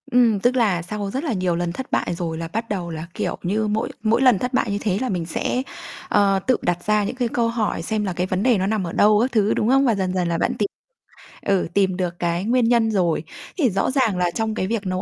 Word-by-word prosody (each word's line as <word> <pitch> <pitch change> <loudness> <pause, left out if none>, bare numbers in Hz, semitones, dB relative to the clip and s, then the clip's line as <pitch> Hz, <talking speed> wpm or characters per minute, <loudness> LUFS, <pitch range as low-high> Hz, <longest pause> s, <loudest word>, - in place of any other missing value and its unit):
Ừm, 235 -4 +4
tức 245 +5 +2
là 205 -8 +2
sau 200 +3 -4
rất 265 +7 -3
là 300 - -1
nhiều 185 -3 0
lần 175 0 -1
thất 260 +9 -7
bại - - 0
rồi 165 -2 -3
là 165 0 -4
bắt 225 +7 -4
đầu 180 -4 -3
là, 160 +1 -6
kiểu - - -2
như, 210 +4 0
mỗi 210 +1 -1
mỗi 225 +2 +2
lần 250 -7 +5
thất 250 +1 -3
bại 235 -4 +1
như 200 - 0
thế 195 -3 0
là 260 - -1
mình 175 -4 -2
sẽ, 245 +8 -1 0.5
ờ, 200 -1 +3
tự 255 - +4
đặt 175 0 -1
ra 210 0 +2
những 205 - -3
cái 250 -2 0
câu 235 0 0
hỏi 230 -7 -1
xem 215 +4 -2
là 190 -3 -2
cái 180 +2 -1
vấn 185 +1 -1
đề 250 -4 +4
nó 190 0 0
nằm 210 -1 0
ở 165 - -6
đâu 210 0 +5
các 255 +3 0
thứ, 215 -2 +2
đúng 215 - 0
không? 270 +1 +4
Và 235 -4 +3
dần 190 -2 -1
dần 180 -2 0
là 170 -1 0
bạn - - 0
tìm 205 - +2 0.7
ừ, 195 -2 +1
tìm 190 -2 +2
được 175 -2 -3
cái 170 +1 -1
nguyên 240 +3 +2
nhân 230 -2 +3
rồi. 175 -6 +1 0.3
Thì 285 -9 +3
rõ 195 +4 0
ràng 255 -8 +1
là 180 -1 +1
trong 220 +2 -2
cái 185 - -1
việc 215 -1 -2
nấu 185 0 -2
205 Hz, 275 wpm, -22 LUFS, 180-230 Hz, 0.7 s, lần